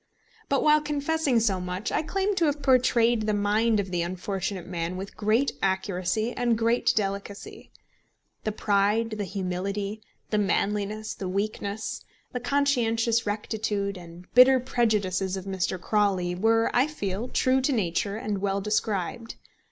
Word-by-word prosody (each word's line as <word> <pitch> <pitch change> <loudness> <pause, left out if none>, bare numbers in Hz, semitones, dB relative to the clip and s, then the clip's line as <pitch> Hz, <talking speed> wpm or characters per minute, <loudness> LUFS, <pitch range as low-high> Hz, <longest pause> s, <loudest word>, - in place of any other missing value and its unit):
But 275 - +2
while 305 0 +5
confessing 295 -3 +1
so 205 -4 +1
much, 180 +3 -4
I - - +1
claim 390 +5 -1
to 340 - +3
have 290 -1 -1
portrayed 240 -4 +3
the 210 - +2
mind 210 +2 +2
of 190 -2 -3
the 175 -1 0
unfortunate 185 +1 -3
man 175 0 -3
with 195 +1 -7
great 220 +6 +2
accuracy 190 +4 0
and 240 -2 +1
great 230 +2 +2
delicacy. 200 -1 -4 0.7
The 215 - -1
pride, 210 +2 +1
the 205 - -1
humility, 195 +2 -3 0.3
the 210 - +2
manliness, 210 +1 -1
the 190 - -5
weakness, 200 +2 -3 0.3
the 250 - -3
conscientious 235 -4 +1
rectitude 205 -1 -2
and 175 0 -11
bitter 255 +1 +7
prejudices 205 -7 0
of 190 - -7
Mr. 190 -1 -2
Crawley 190 -3 +1
were, 225 +5 +2
I 250 +4 +4
feel, 205 -6 -4
true 260 +1 +2
to 265 - +1
nature 200 -2 -1
and 210 -3 -3
well 200 0 0
described. 210 +1 -2
210 Hz, 145 wpm, -26 LUFS, 195-235 Hz, 0.7 s, bitter